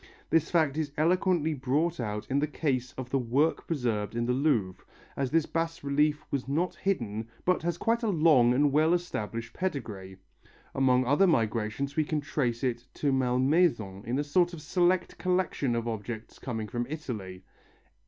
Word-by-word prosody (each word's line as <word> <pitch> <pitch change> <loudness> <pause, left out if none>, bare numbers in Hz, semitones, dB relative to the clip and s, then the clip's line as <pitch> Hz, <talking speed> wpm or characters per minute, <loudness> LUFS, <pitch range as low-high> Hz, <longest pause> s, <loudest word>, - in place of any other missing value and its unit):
This 165 -2 +3
fact 155 -4 +2
is 155 -3 -2
eloquently 170 0 +2
brought 145 +5 0
out 105 -3 -3
in 135 +1 +1
the 150 - +1
case 130 -5 -1
of 130 -1 -7
the 135 - +2
work 130 +6 +1
preserved 115 -9 -1
in 120 0 0
the 125 - +1
Louvre, 120 -10 0 0.3
as 135 -2 -1
this 160 +1 +2
bas 165 -1 -3
relief 150 +1 +1
was 135 -2 -2
not 165 +6 0
hidden 115 - -2 0.2
but 180 0 +2
has 170 +1 -1
quite 230 +5 +1
a 230 - -1
long 155 -9 +5
and 140 +3 +3
well 155 +4 +4
established 115 -9 -4
pedigree. 110 - -4 0.6
Among 130 -1 +3
other 145 +10 +4
migrations 115 0 0
we 155 - +3
can 155 0 -1
trace 130 -4 -2
it 120 -1 -2
to 145 - 0
Malmaison 130 - +1
in 120 +3 -2
a 145 - +1
sort 175 +4 +2
of 165 - -7
select 180 0 +1
collection 180 -9 0
of 115 0 -2
objects 110 0 -6
coming 110 -4 -4
from 120 +1 -3
Italy. 105 -12 -6
140 Hz, 175 wpm, -29 LUFS, 120-160 Hz, 0.6 s, long